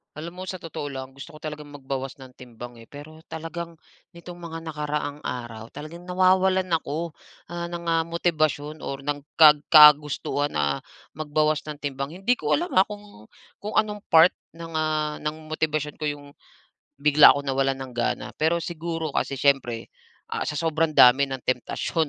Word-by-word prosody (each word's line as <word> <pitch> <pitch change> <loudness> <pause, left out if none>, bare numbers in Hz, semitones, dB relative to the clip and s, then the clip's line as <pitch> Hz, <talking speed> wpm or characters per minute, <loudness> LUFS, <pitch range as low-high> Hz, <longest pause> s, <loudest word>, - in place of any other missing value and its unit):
Alam 170 +4 -8
mo 185 - -5
sa 185 - -4
totoo 155 -3 -6
lang, 130 -1 -7
gusto 135 +4 -11
ko - - -12
talagang 150 -1 -7
magbawas 135 -1 -5
ng 130 -2 -13
timbang, 120 -1 -11
eh, 115 - -14
pero 155 +2 -12
talagang 165 +1 -6 0.4
nitong 175 +1 -10
mga 165 -1 -7
nakaraang 150 -2 -4
araw 120 -5 -6
talagang 170 +7 -10
nawawalan 185 0 +3
ako, 165 +1 -1 0.4
ah, 170 0 -4
ng, 170 0 -6
ah, 165 -1 +1
motibasyon 155 -3 -1
or 135 -1 -6
ng 145 0 -2 0.2
kag 150 -2 +8
kagustuhan 150 -2 +6
na 70 -2 0 0.3
magbawas 155 0 0
ng 150 -1 -6
timbang. 140 +2 -4
Hindi 240 +5 +4
ko - - +1
alam 350 +4 -3
ha, 190 - +5
kung 205 - -11 0.3
kung 210 +1 -6
anong 210 -1 +1
part 165 +2 +7 0.2
ng, 165 0 -9
ah, 155 -1 -1
ng 150 +1 -3 0.2
motibasyon 155 -1 -2
ko 155 - -3
'yong, 145 -1 -6 0.7
bigla 150 0 +8
akong 145 0 -5
nawalan 135 0 +1
ng 130 -2 -10
gana. 120 - -1
Pero 160 +2 +2
siguro 165 -1 -4
kasi - - 0
siyempre 135 -5 +1 0.4
ah, - - -3
sa - - -3
sobrang 160 0 0
dami 130 +3 +7
ng 135 -1 -5
temptasyon 130 +5 -1
150 Hz, 170 wpm, -25 LUFS, 140-165 Hz, 0.7 s, kag